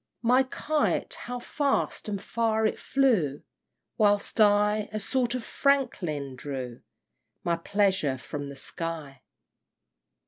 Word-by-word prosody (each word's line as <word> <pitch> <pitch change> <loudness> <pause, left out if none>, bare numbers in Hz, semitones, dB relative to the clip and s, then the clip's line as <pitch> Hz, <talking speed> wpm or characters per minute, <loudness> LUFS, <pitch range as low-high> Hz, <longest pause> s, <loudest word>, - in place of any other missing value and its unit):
IV. - - -52
My 250 +3 +5
kite 295 +3 0
how 245 +1 -6
fast 275 -2 -1
and 200 -1 -2
far 220 +1 0
it 215 - 0
flew! 220 - +2 0.6
Whilst 205 +1 +3
I, 210 0 +4
a 215 - -2
sort 245 +3 0
of 250 - -3
Franklin, 175 - 0
drew 130 -3 -6 0.6
My 170 - +1
pleasure 190 -5 +1
from 145 +2 -6
the 140 - -8
sky! 155 -3 -5
205 Hz, 125 wpm, -28 LUFS, 150-240 Hz, 0.6 s, My